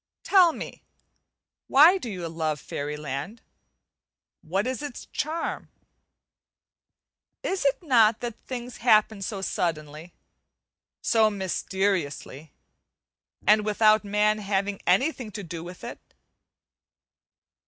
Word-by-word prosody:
Tell 365 Hz, -4 st, +6 dB
me, -, -, -8 dB, 0.9 s
why 325 Hz, +8 st, +7 dB
do 245 Hz, -, -6 dB
you 180 Hz, -5 st, -5 dB
love 160 Hz, -2 st, -2 dB
fairy 145 Hz, +2 st, -5 dB
land? 150 Hz, -, -6 dB, 1.0 s
what 190 Hz, +6 st, -1 dB
is 260 Hz, +2 st, -3 dB
its 290 Hz, -5 st, -7 dB
charm? 320 Hz, +3 st, -3 dB, 1.7 s
Is 380 Hz, -5 st, -2 dB
it 280 Hz, +6 st, +1 dB
not 230 Hz, -7 st, +4 dB
that 240 Hz, -2 st, -6 dB
things 245 Hz, -2 st, -6 dB
happen 215 Hz, -3 st, +3 dB
so 195 Hz, 0 st, -4 dB
suddenly, 155 Hz, -2 st, -3 dB, 0.9 s
so 220 Hz, -2 st, +4 dB
mysteriously, 185 Hz, -7 st, -2 dB, 0.9 s
and 210 Hz, 0 st, +5 dB
without 215 Hz, 0 st, +4 dB
man 210 Hz, +1 st, +1 dB
having 200 Hz, -1 st, -2 dB
anything 250 Hz, -, +1 dB
to 205 Hz, -, -6 dB
do 165 Hz, -2 st, -7 dB
with 180 Hz, +1 st, -10 dB
it? -, -, -7 dB
210 Hz, 105 wpm, -26 LUFS, 175-240 Hz, 1.7 s, why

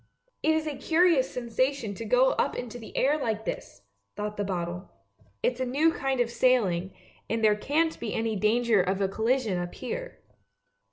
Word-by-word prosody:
" -, -, -51 dB
" -, -, -50 dB
It 315 Hz, +1 st, +3 dB
is 315 Hz, 0 st, 0 dB
a 300 Hz, -2 st, -3 dB
curious 325 Hz, -4 st, +3 dB
sensation 250 Hz, -1 st, -1 dB
to 225 Hz, +4 st, -7 dB
go 250 Hz, +4 st, +4 dB
up -, -, 0 dB
into 245 Hz, 0 st, -6 dB
the 225 Hz, -, -10 dB
air 290 Hz, +3 st, +3 dB
like 220 Hz, -4 st, -2 dB
this! 100 Hz, -, -6 dB
" 100 Hz, 0 st, -49 dB
thought 210 Hz, 0 st, -4 dB
the 205 Hz, -, -2 dB
bottle. 180 Hz, -1 st, -4 dB, 0.3 s
" 100 Hz, +1 st, -33 dB
It's 250 Hz, 0 st, +1 dB
a -, -, +1 dB
new 290 Hz, +6 st, +3 dB
kind 270 Hz, -3 st, -1 dB
of 240 Hz, -1 st, +1 dB
sailing, 195 Hz, -9 st, +2 dB, 0.4 s
and 225 Hz, 0 st, -1 dB
there 210 Hz, -1 st, +5 dB
can't 315 Hz, +9 st, 0 dB
be 230 Hz, -3 st, -4 dB
any 225 Hz, -1 st, -1 dB
danger 220 Hz, +1 st, +3 dB
of 190 Hz, +2 st, -1 dB
a 195 Hz, -, +2 dB
collision 220 Hz, -1 st, 0 dB
up 175 Hz, 0 st, -5 dB
here! -, -, -5 dB
230 Hz, 205 wpm, -27 LUFS, 200-265 Hz, 0.4 s, there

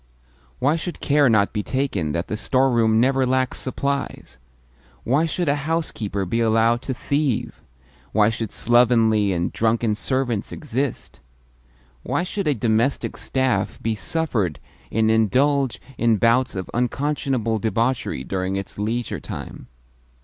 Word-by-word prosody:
Why 145 Hz, +5 st, +2 dB
should 175 Hz, +1 st, -5 dB
care 145 Hz, -2 st, +3 dB
not 105 Hz, -3 st, +3 dB
be 105 Hz, -, -1 dB
taken 105 Hz, -, -1 dB
that 85 Hz, +2 st, -2 dB
the -, -, -3 dB
storeroom 115 Hz, -1 st, +2 dB
never 135 Hz, +2 st, +3 dB
lacks 130 Hz, 0 st, 0 dB
supplies? 140 Hz, -, -3 dB, 0.6 s
Why 145 Hz, +7 st, +2 dB
should 175 Hz, +1 st, -2 dB
a 140 Hz, -, +3 dB
housekeeper 110 Hz, -12 st, -2 dB
be 115 Hz, +6 st, -1 dB
allowed 115 Hz, +1 st, +3 dB
to 130 Hz, -, -3 dB
thieve? 140 Hz, -2 st, -1 dB, 0.5 s
Why 105 Hz, +1 st, +3 dB
should 115 Hz, -1 st, -4 dB
slovenly 115 Hz, -4 st, +3 dB
and 85 Hz, -1 st, -1 dB
drunken 115 Hz, 0 st, +1 dB
servants 120 Hz, -1 st, -1 dB
exist? 140 Hz, -2 st, -4 dB, 0.8 s
Why 140 Hz, -, -1 dB
should 195 Hz, 0 st, -3 dB
a 145 Hz, -, +2 dB
domestic 115 Hz, +4 st, 0 dB
staff 130 Hz, -7 st, -1 dB
be 115 Hz, -, -1 dB
suffered 105 Hz, -, -1 dB, 0.3 s
in 110 Hz, 0 st, +2 dB
indulge 130 Hz, +5 st, +2 dB, 0.2 s
in 115 Hz, -2 st, +3 dB
bouts 115 Hz, +3 st, +2 dB
of 95 Hz, -1 st, -4 dB
unconscionable 125 Hz, -2 st, -1 dB
debauchery 115 Hz, -, -1 dB
during 95 Hz, +4 st, -2 dB
its 100 Hz, +1 st, -5 dB
leisure 115 Hz, +3 st, -2 dB
time? -, -, -8 dB
115 Hz, 135 wpm, -22 LUFS, 110-135 Hz, 0.8 s, care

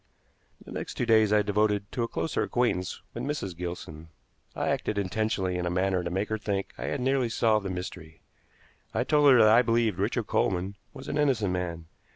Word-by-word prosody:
The -, -, -11 dB
next -, -, -5 dB
two 125 Hz, -, -1 dB
days 110 Hz, -2 st, +4 dB
I 105 Hz, 0 st, +4 dB
devoted 105 Hz, 0 st, 0 dB
to 120 Hz, -, -3 dB
a 115 Hz, -, 0 dB
closer 160 Hz, -, -2 dB
acquaintance 115 Hz, -7 st, -1 dB
with -, -, -5 dB
Mrs. 140 Hz, -, -3 dB
Gilson. 85 Hz, -2 st, -7 dB, 0.5 s
I -, -, -1 dB
acted 105 Hz, -, -1 dB
intentionally 95 Hz, -2 st, -1 dB
in 90 Hz, -, -1 dB
a -, -, 0 dB
manner 90 Hz, 0 st, 0 dB
to 85 Hz, -, -3 dB
make 95 Hz, +4 st, -2 dB
her 110 Hz, 0 st, -2 dB
think 100 Hz, -2 st, -3 dB
I -, -, -6 dB
had 145 Hz, -, -2 dB
nearly 130 Hz, -1 st, +1 dB
solved 110 Hz, -3 st, +2 dB
the -, -, -4 dB
mystery. 90 Hz, -3 st, -7 dB, 0.8 s
I -, -, +2 dB
told 150 Hz, -2 st, +4 dB
her 130 Hz, -, +7 dB
that 110 Hz, -2 st, +7 dB
I 120 Hz, -, +7 dB
believed 115 Hz, -5 st, +1 dB
Richard 110 Hz, +3 st, 0 dB
Coleman 95 Hz, -1 st, 0 dB, 0.2 s
was -, -, -11 dB
an 150 Hz, -, -2 dB
innocent 120 Hz, -10 st, +2 dB
man. 85 Hz, -2 st, -3 dB
105 Hz, 200 wpm, -28 LUFS, 90-115 Hz, 0.8 s, her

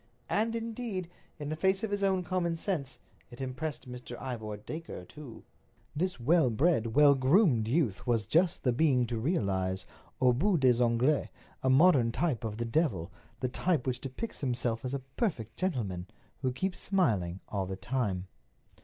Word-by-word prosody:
And, 225 Hz, +2 st, +1 dB
indeed, 225 Hz, -6 st, -4 dB, 0.3 s
in 145 Hz, -2 st, -5 dB
the 155 Hz, -, -2 dB
face 190 Hz, +5 st, +1 dB
of 220 Hz, -, -2 dB
his 205 Hz, 0 st, -1 dB
own 190 Hz, -2 st, +2 dB
common 175 Hz, -2 st, 0 dB
sense, 160 Hz, -7 st, -2 dB, 0.3 s
it 120 Hz, -, -12 dB
impressed 130 Hz, +3 st, -4 dB
Mr. 125 Hz, -1 st, -8 dB
Ivor 110 Hz, -5 st, -5 dB
Dacre 155 Hz, -, -7 dB
too. 135 Hz, 0 st, -11 dB, 0.5 s
This 180 Hz, 0 st, -1 dB
well 145 Hz, +2 st, +4 dB
bred, 115 Hz, -3 st, +1 dB
well 145 Hz, -1 st, +7 dB
groomed 135 Hz, -, +3 dB
youth 125 Hz, -, 0 dB
was 115 Hz, -3 st, +2 dB
just 165 Hz, -, +2 dB
the 125 Hz, -, +2 dB
being 130 Hz, -2 st, +3 dB
to 115 Hz, -1 st, -3 dB
realize—aux 100 Hz, -, 0 dB
bouts 175 Hz, +7 st, +2 dB
des 125 Hz, -2 st, +4 dB
ongles—a 130 Hz, +2 st, 0 dB
modern 130 Hz, -4 st, +5 dB
type 140 Hz, -4 st, -1 dB
of 110 Hz, -2 st, -3 dB
the 120 Hz, -, -2 dB
devil, 115 Hz, -, 0 dB, 0.3 s
the 125 Hz, -, +1 dB
type 155 Hz, +2 st, 0 dB
which 130 Hz, -2 st, -2 dB
depicts 140 Hz, -, -6 dB
him 130 Hz, -3 st, 0 dB
as 120 Hz, +2 st, -2 dB
a -, -, -2 dB, 0.2 s
perfect 115 Hz, -, -1 dB
gentleman, 105 Hz, -, -2 dB, 0.3 s
who 130 Hz, -2 st, +1 dB
keeps 185 Hz, +8 st, -2 dB
smiling 105 Hz, -, +1 dB
all 95 Hz, -2 st, -2 dB
the 95 Hz, -, -4 dB
time. 100 Hz, -4 st, -2 dB
130 Hz, 160 wpm, -30 LUFS, 115-170 Hz, 0.5 s, well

